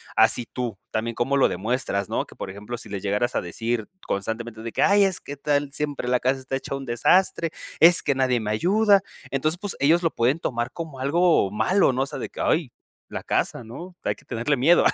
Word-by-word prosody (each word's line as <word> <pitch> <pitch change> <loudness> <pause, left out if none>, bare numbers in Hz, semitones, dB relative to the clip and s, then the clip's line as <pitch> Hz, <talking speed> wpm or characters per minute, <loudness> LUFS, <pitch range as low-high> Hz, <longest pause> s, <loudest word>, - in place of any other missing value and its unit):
a 110 - +7
si 120 +1 -2
tú, 120 -6 -4
también 115 +1 -2
cómo 135 +3 0
lo 135 - +5
demuestras, 100 0 -2
¿no? - - -1
Que, - - -15
por 95 - -6
ejemplo, 105 +5 -7
si - - -10
les 100 -2 -5
llegaras 105 +5 0
a - - +1
decir 115 +5 -3 0.2
constantemente 110 +3 -4
de 115 0 -5
que, - - +1
ay, 200 0 +5
es 190 -2 +1
que 145 - -8
tal 145 0 -1
siempre 145 -4 -3
la 125 0 +2
casa 130 +2 +1
está 130 +1 -4
hecha 135 - -5
un 135 0 -6
desastre, 165 +8 +2 0.3
es 170 +2 +7
que 140 - +2
nadie 130 -2 +1
me 105 -1 -3
ayuda, 200 - +4 0.3
entonces, 155 +5 0
pues, 205 - -4
ellos 165 +5 +4
lo 165 - +2
pueden 125 +6 +2
tomar 120 -1 -2
como 160 -6 -7
algo 160 - +3
malo, 135 - +2
¿no?, 130 +1 0
o - - -2
sea, 145 - -6
de - - -5
que: - - -12
ay, 155 -6 +1 0.4
la - - -6
casa, - - -1
¿no? 170 +11 -9
Hay - - 0
que - - -22
tenerle 120 +6 -1
miedo. 160 +8 +5
130 Hz, 230 wpm, -24 LUFS, 115-155 Hz, 0.4 s, a